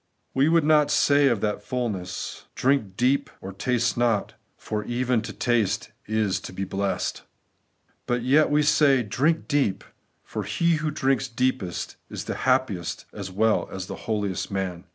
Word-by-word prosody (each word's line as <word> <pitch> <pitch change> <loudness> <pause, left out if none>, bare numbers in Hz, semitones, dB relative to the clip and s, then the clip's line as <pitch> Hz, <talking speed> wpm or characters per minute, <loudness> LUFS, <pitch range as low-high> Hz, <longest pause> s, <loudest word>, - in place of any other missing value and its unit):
We 135 +3 +3
would 165 -1 +4
not 150 -1 +4
say 145 0 +4
of 115 -6 +1
that 105 -1 -1
fulness, 105 -7 -4
' - - -46
Drink 125 -8 +1
deep 130 +3 +2
or 95 +1 -8
taste 120 +4 0
not,' 115 -4 +1 0.2
for 105 -1 -4
even 125 -1 0
to 110 -1 -6
taste 115 -3 0 0.2
is 110 -3 +1
to - - -8
be 95 +1 -4
blest. 95 +1 -2 0.9
But 120 -1 0
yet 145 +5 +4
we 150 +1 +3
say, 140 -3 +4
Drink 145 +10 0
deep; 140 -10 +1 0.4
for - - -5
he 170 -1 +1
who 155 0 -1
drinks 135 -2 0
deepest 125 -7 -2
is - - -5
the - - -3 0.2
happiest 120 -10 0
as 100 -2 -6
weU 110 +4 +1
as 95 -1 -5
the - - -6
holiest 105 -4 -1
man. 95 -2 -3
120 Hz, 165 wpm, -25 LUFS, 100-135 Hz, 0.9 s, would